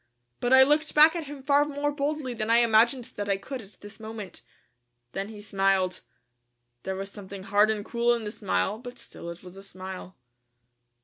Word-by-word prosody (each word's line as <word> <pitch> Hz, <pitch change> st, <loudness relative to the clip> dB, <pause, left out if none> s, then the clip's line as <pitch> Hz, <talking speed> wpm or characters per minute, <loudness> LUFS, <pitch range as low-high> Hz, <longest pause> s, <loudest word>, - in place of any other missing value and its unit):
But 245 Hz, -, -1 dB
I 265 Hz, 0 st, +9 dB
looked 300 Hz, +3 st, +2 dB
back 310 Hz, +3 st, +8 dB
at 335 Hz, -2 st, -3 dB
him 280 Hz, -2 st, -9 dB
far 285 Hz, +1 st, +4 dB
more 290 Hz, 0 st, -2 dB
boldly 285 Hz, -2 st, -2 dB
than 215 Hz, -1 st, -3 dB
I 230 Hz, -, +5 dB
imagined 235 Hz, +2 st, +4 dB
that 205 Hz, 0 st, -3 dB
I 195 Hz, -, +2 dB
could 255 Hz, +6 st, -7 dB
at 200 Hz, -1 st, -15 dB
this 205 Hz, +2 st, -11 dB
moment. 220 Hz, -3 st, -8 dB, 0.7 s
Then 195 Hz, -, -4 dB
he 215 Hz, -2 st, -10 dB
smiled. 195 Hz, -3 st, +1 dB, 0.8 s
There 190 Hz, -, -4 dB
was 195 Hz, +1 st, -6 dB
something 195 Hz, -1 st, -9 dB
hard 205 Hz, +2 st, +3 dB
and 210 Hz, -2 st, -1 dB
cruel 240 Hz, 0 st, +2 dB
in 230 Hz, -, -5 dB
the 210 Hz, -, -4 dB
smile 95 Hz, -, -1 dB
but 245 Hz, 0 st, -9 dB
still 170 Hz, -, -10 dB
it 170 Hz, +1 st, -9 dB
was 180 Hz, +1 st, -12 dB
a -, -, -9 dB
smile. 185 Hz, -1 st, -9 dB
220 Hz, 195 wpm, -27 LUFS, 195-265 Hz, 0.8 s, I